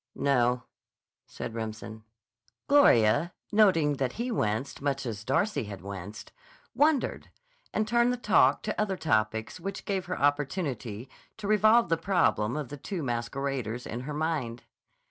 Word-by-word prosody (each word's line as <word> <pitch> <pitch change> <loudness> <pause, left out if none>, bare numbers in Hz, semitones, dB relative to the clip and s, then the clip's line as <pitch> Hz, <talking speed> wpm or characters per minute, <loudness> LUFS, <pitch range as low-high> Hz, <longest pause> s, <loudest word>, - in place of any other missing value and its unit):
"No," 125 -3 +2 0.6
said - - -7
Remsen. 110 -1 -6 0.6
Gloria, 165 - +5 0.2
noting 165 -9 +4
that 130 -2 -1
he 240 +2 -3
winced 110 - -2
much 140 -1 -1
as 110 -3 -5
Darcy 140 - 0
had 100 -3 -8
winced, 100 +1 -8 0.4
wondered, 295 -2 +1 0.4
and 215 0 0
turned 235 +2 +3
the 250 - -2
talk 185 - +3
to 215 - -2
other 195 -3 -1
topics 110 -3 0
which 195 +3 -6
gave 195 -2 -2
her 185 - -3
opportunity 140 - -1 0.3
to 215 -2 -5
revolve 215 +3 +4
the 165 - +2
problem 155 - +1
of 145 -5 -4
the 145 - -7
two 175 +4 -5
masqueraders 125 0 -3
in 120 - -5
her 140 +4 -5
mind. 150 -7 -2
140 Hz, 145 wpm, -28 LUFS, 115-195 Hz, 0.6 s, Gloria